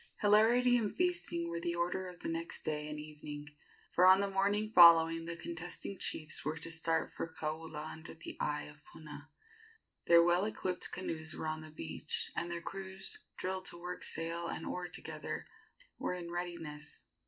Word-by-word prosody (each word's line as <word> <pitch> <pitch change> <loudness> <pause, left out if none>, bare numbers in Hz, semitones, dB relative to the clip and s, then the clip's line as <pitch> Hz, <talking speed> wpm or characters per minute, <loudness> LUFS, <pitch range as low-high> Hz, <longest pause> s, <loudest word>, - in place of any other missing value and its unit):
Hilarity 230 +4 +6
and 215 -4 -1
feasting 345 - +1
were 170 0 -3
the 170 0 -1
order 175 +2 -1
of 180 -1 -10
the - - -3
next 165 0 -3
day 150 -1 -2
and 150 0 -4
evening, 150 -1 -7 0.4
for 180 +1 +6
on 190 +1 +9
the 200 0 0
morning 205 +2 +1
following 165 -1 +8
the 170 0 -4
contesting 175 +4 -5
chiefs 155 -1 -2
were 155 +3 -1
to 165 +1 -4
start 165 0 0
for 165 - -4
Kaula 155 -1 -4
under 160 0 -9
the 160 - -8
eye 150 0 0
of 150 - -10
Puna. 150 -1 -10 0.8
Their 170 0 +8
well 175 +3 +4
equipped 185 -4 -2
canoes 160 -3 -4
were - - -4
on 155 0 -2
the 155 - -9
beach, 150 - -3
and 170 - -1
their 170 0 -3
crews, 190 0 -6 0.2
drilled 185 0 -2
to 175 - -5
work 180 +1 -5
sail 165 +1 -2
and 165 - -4
oar 180 0 -3
together, 180 - -5 0.5
were 180 - -1
in 170 -1 -6
readiness. 170 -4 -5
170 Hz, 175 wpm, -34 LUFS, 160-185 Hz, 0.8 s, on